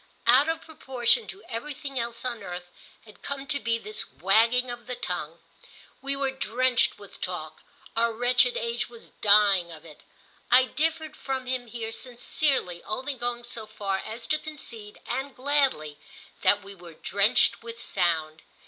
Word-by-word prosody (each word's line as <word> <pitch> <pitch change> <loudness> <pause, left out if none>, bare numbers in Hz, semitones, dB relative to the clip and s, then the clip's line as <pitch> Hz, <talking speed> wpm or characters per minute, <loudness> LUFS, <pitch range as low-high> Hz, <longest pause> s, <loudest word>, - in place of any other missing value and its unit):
Out 260 +6 +6
of 325 0 -1
proportion 295 - +1
to 395 - -8
everything 275 +2 -4
else 235 +1 -4
on 240 -3 -3
earth 175 -2 -7 0.3
had 215 -2 -16
come 280 -1 -4
to 285 -1 +1
be 230 -3 0
this 215 -1 -4
wagging 230 +7 +3
of 240 0 -9
the 250 - -2
tongue. 175 -8 -3 0.6
We 275 +1 -1
were 275 -1 0
drenched 255 0 +2
with 200 -1 -12
talk—our 180 +7 -3
wretched 245 +2 +4
age 235 +1 -1
was 235 -1 -13
dying 200 -4 +5
of 160 -1 -11
it. 155 -2 -13 0.5
I 255 +1 +7
differed 315 +3 -1
from 265 -1 -3
him 250 -1 -2
here 225 -1 -5
sincerely, 245 - 0
only 260 +6 -2
going 240 -1 -3
so 230 -2 -6
far 195 -2 -2
as 230 +2 -5
to 305 +5 +1
concede, 235 -9 -8
and 270 +1 -3
gladly, 260 - +1 0.4
that 205 0 +4
we 200 0 -9
were 175 -3 -13
drenched 200 +8 +3
with 230 0 -8
sound. 160 -6 0
235 Hz, 155 wpm, -27 LUFS, 200-265 Hz, 0.6 s, I